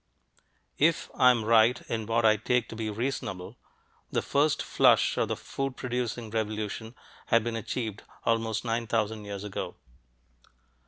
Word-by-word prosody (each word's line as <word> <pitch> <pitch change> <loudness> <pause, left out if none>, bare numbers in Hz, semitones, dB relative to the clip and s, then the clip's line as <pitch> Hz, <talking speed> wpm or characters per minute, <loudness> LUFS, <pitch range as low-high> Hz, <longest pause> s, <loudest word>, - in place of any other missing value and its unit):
If 160 +2 +2
I 125 - +6
am 120 -3 +2
right 115 +2 +5
in 110 -2 -3
what 115 0 +2
I 110 -1 +6
take 120 +3 0
to - - -7
be 110 -1 -3
"reasonable," 105 -5 -4 0.5
the - - 0
first 145 +1 +2
flush - - +4
of - - +1
the - - -1
food 135 -1 -4
producing 120 -2 -3
revolution 110 +1 -3 0.3
had 115 -1 +4
been 120 0 -2
achieved 110 -2 -4 0.2
almost 115 0 0
nine 115 0 -1
thousand 110 -1 -1
years 100 -1 -6
ago. 105 -2 -5
115 Hz, 150 wpm, -28 LUFS, 110-120 Hz, 0.5 s, I